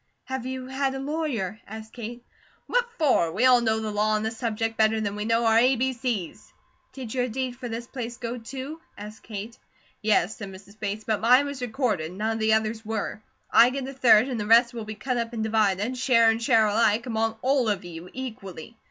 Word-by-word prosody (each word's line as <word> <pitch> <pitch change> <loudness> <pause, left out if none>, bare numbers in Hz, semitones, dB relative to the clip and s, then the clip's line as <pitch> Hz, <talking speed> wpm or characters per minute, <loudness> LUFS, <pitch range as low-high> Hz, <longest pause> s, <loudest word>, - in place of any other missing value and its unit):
"Have 260 -1 -4
you 260 0 -5
had 265 +1 -1
a - - -4
lawyer?" 270 - -2
asked 220 +1 -9
Kate. 240 +1 -8 0.4
"What - - 0
for? 260 - +3
We 220 +9 +1
all 250 -1 +6
know 220 -1 +1
the 220 -1 -3
law 210 +1 +1
on 215 - -1
this 220 +1 -3
subject 225 -1 -2
better 220 0 +3
than 205 -2 -2
we 210 0 -3
know 230 +1 +2
our 225 0 +5
a, 255 +3 +4
b, 260 +2 0
c's." 235 -8 -4 0.4
"Did 255 -5 -7
your 250 -1 0
deed 255 +1 -3
for 245 -1 -7
this 230 +1 -5
place 240 -2 -6
go, 240 +1 -5
too?" 270 +7 -7 0.2
asked 210 +1 -9
Kate. 215 +1 -8 0.4
"Yes," 215 -2 +2
said 200 -2 -7
Mrs. 195 +2 -14
Bates, 210 +1 -3
"but 215 -1 -1
mine 250 +5 +5
was 285 -2 -6
recorded, 220 - -1
none 215 +4 -1
of 225 - -2
the 220 0 +3
others 220 0 0
were. 215 -1 -4 0.3
I 240 - +7
get 265 0 -4
a 270 - -6
third, 250 -3 +5
and 250 -4 -3
the 210 - -3
rest 235 +2 +6
will 230 -2 -5
be 215 0 -6
cut 250 +4 -2
up 235 0 -2
and 220 -2 -2
divided, 215 +1 +1
share 230 -3 +5
and 225 +1 -3
share 230 -3 +4
alike, 215 +2 +2
among 225 -2 -1
ALL 260 -3 +2
OF 200 -3 -2
YOU, 170 +1 -9
equally. 225 -6 -8
225 Hz, 220 wpm, -26 LUFS, 215-255 Hz, 0.4 s, I